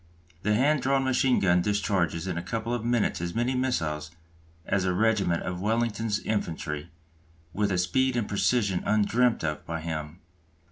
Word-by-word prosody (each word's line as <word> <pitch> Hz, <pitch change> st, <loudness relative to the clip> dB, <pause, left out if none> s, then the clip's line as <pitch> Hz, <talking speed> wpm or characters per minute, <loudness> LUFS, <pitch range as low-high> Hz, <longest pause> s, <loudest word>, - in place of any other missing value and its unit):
The 105 Hz, +2 st, +1 dB
hand 140 Hz, +5 st, +3 dB
drawn 135 Hz, 0 st, +2 dB
machine 130 Hz, -1 st, +2 dB
gun 90 Hz, -2 st, +3 dB
discharges 95 Hz, -4 st, 0 dB
in 90 Hz, -3 st, -2 dB
a 85 Hz, -, -2 dB
couple 115 Hz, +6 st, -3 dB
of 120 Hz, -2 st, -2 dB
minutes 120 Hz, -7 st, +1 dB
as 85 Hz, 0 st, -4 dB
many 120 Hz, +3 st, +1 dB
missiles 80 Hz, -13 st, -1 dB, 0.6 s
as 95 Hz, -1 st, +1 dB
a 90 Hz, -1 st, 0 dB
regiment 100 Hz, -5 st, +2 dB
of 90 Hz, -1 st, -4 dB
Wellington's 110 Hz, 0 st, 0 dB
infantry, 80 Hz, -6 st, -3 dB, 0.6 s
with 100 Hz, +2 st, 0 dB
a 95 Hz, -, +1 dB
speed 130 Hz, +8 st, +1 dB
and 115 Hz, -, -1 dB
precision 100 Hz, -2 st, +1 dB
undreamt 115 Hz, +2 st, +2 dB
of 75 Hz, -1 st, -2 dB
by 80 Hz, 0 st, -4 dB
him. 80 Hz, 0 st, -5 dB
105 Hz, 160 wpm, -27 LUFS, 85-120 Hz, 0.6 s, hand